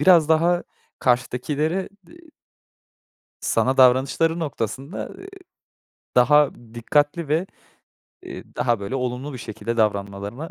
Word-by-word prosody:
biraz 165 -1 +6
daha 170 +2 +3 0.4
karşıdakilere, 145 +8 0 0.2
eee 340 - -16 1.2
Sana 130 +1 +1
davranışları 135 +6 +4
noktasında, 140 - -4
eee, 385 - -10 0.9
daha 145 +3 +5 0.2
dikkatli 145 +6 0
ve, 165 +5 +1 0.8
eee, - - -9
daha, 120 -4 +1
böyle, 100 +6 -5
olumlu 125 +2 -3
bir 130 - -7
şekilde 115 0 -5
davranmalarına 100 +6 -2
135 Hz, 105 wpm, -23 LUFS, 120-160 Hz, 1.2 s, biraz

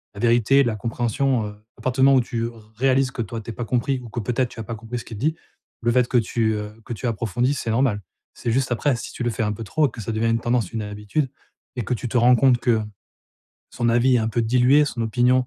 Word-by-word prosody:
la - - -9
vérité, 120 +3 +4
la 120 -4 -1
compréhension, 120 +1 0
heu, 105 - -10 0.2
à - - -14
partir 130 +1 -1
du - - +8
moment 135 -1 +6
où 130 - +5
tu 115 -1 -3
r 110 -2 -13
réalises 130 +1 +2
que 120 - -4
toi, 115 +2 -6
tu 115 - -10
es - - -7
pas 120 - -4
compris 130 +3 0
ou 120 - -10
que 120 - -4
peut-être, 125 +4 0
tu - - -12
as - - -3
pas 115 +1 -5
compris 115 +2 -6
ce - - -8
qu'il 110 - -8
dit, 155 +8 0 0.5
le 120 0 +2
fait 125 0 +3
que 125 - -4
tu, 115 -1 +1
heu, 105 0 -5
que - - -5
tu 115 - -6
approfondisses, 120 +4 0
c'est - - -4
normal. 115 -3 +1 0.3
C'est 120 - -4
juste 130 +1 0
après, 130 +3 +1
si - - -7
tu 125 - -4
le 120 - +1
fais 115 - -2
un 105 - 0
peu 115 - -7
trop 150 +8 +2
et - - -8
que 115 - -11
ça 110 +2 -4
devient 115 +1 +1
une 115 0 +2
tendance, 120 -5 0
une 110 - -2
habitude 105 +7 -2 0.5
et - - 0
que - - -1
tu 120 - -5
te 125 - 0
rends 125 +1 +6
compte 130 -2 +4
que, 120 -4 +2 0.9
son 120 - -1
avis 120 +2 +4
est - - +3
un 110 -1 0
peu 115 +1 0
dilué, 125 +5 +4
son 120 -4 -3
opinion, 125 +2 +2
120 Hz, 280 wpm, -23 LUFS, 110-130 Hz, 0.9 s, du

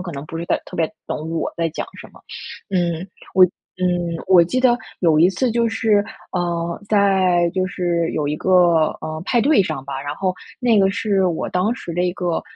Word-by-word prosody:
可 180 -2 -6
能 140 +1 -6
不 165 - -6
是 170 - -4
在 - - 0
特 - - -10
别 165 -1 +2 0.2
懂 155 +1 -4
我 165 - -2
在 165 0 0
讲 - - -4 0.2
什 - - -10
么。 - - -17 0.5
嗯， 175 -2 0 0.7
我 185 - -1
嗯， 175 -2 -1
我 175 -3 +7
记 255 +9 -1
得 245 -2 +4 0.2
有 165 -4 +4
一 170 +3 +6
次 250 +5 0
就 235 +1 +1
是， 220 -2 +2 0.3
呃， 170 -2 -2
在 190 -4 +3
就 185 0 +1
是 175 -3 -1
有 150 -2 -1
一 150 - -1
个， 175 -4 +4
呃， 155 0 -5
派 240 - +2
对 280 -1 +4
上 135 -7 -4
吧， 135 -1 -4
然 145 +1 -4
后 185 +2 -1 0.3
那 235 -3 +3
个 195 -1 +4
是 200 -1 0
我 170 -3 -2
当 205 +6 0
时 175 - -8
的 175 - 0
一 180 -1 0
个， 175 -2 -2
180 Hz, 225 characters per minute, -20 LUFS, 165-195 Hz, 0.7 s, 我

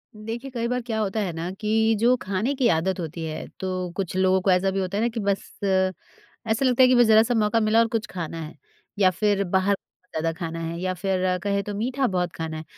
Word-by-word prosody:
देखिए, 225 +5 -6
कई 235 -2 -2
बार 250 +1 -1
क्या 225 -2 -3
होता 215 0 -1
है 195 -4 -1
ना 165 +2 -4
कि 220 +1 +2
जो 245 +3 +4
खाने 195 +8 -1
की 260 -3 +2
आदत 175 +3 +1
होती 165 0 -5
है, 155 -1 -5
तो 185 -1 -3
कुछ 190 -3 -3
लोगों 190 0 +3
को 190 - +2
ऐसा 185 +1 +3
भी 195 - -1
होता 190 +1 -2
है 215 - +1
ना - - +3
कि 230 0 -5
बस 200 -2 0 0.2
अ, 190 -1 +2 0.6
ऐसा 225 +5 +1
लगता 255 0 +3
है - - +8
कि 255 - +5
बस 240 0 +6
ज़रा-सा 220 +2 +5
मौका 220 0 +2
मिला 215 +1 +3
और 230 - +4
कुछ 225 -1 -2
खाना 165 -2 -5
है, 155 0 -8 0.4
या 190 -2 +6
फ़िर 200 +1 +1
बाहर 190 +2 +2
का 185 - -31
ज़्यादा 165 +1 0
खाना 165 -1 -4
है 165 +1 -4
या 185 +1 -1
फ़िर 185 0 0
कहें 200 0 +1
तो 205 - -5
मीठा 250 +5 0
बहुत 180 -3 -1
खाना 160 -1 -4
है। 155 - -6
195 Hz, 250 wpm, -24 LUFS, 185-225 Hz, 0.6 s, है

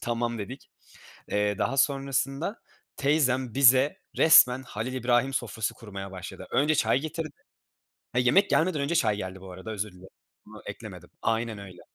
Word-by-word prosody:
tamam 120 0 -2
dedik. 125 +7 -8 0.6
Eee, 105 -1 0
daha 135 - 0
sonrasında 140 - 0 0.4
teyzem 130 -4 +1
bize 135 +6 +5 0.2
resmen 130 -5 +6
Halil 120 +1 -5
İbrahim 125 +2 +1
sofrası 110 -3 -2
kurmaya 100 -3 -8
başladı. 95 -2 -9
Önce 150 +3 +2
çay 115 -1 +2
getirdi. 155 0 -5 0.8
He, 125 - +2
yemek 185 +12 +4
gelmeden 165 -3 +2
önce 145 +5 -1
çay 110 -9 +2
geldi 95 -1 -6
bu 95 0 -11
arada, 95 +5 -8
özür 105 -1 -4
dilerim, 90 +1 -15 0.4
bunu - - -13
eklemedim - - -9
aynen 115 -1 -1
öyle. 95 -3 -11
125 Hz, 150 wpm, -27 LUFS, 105-140 Hz, 0.8 s, resmen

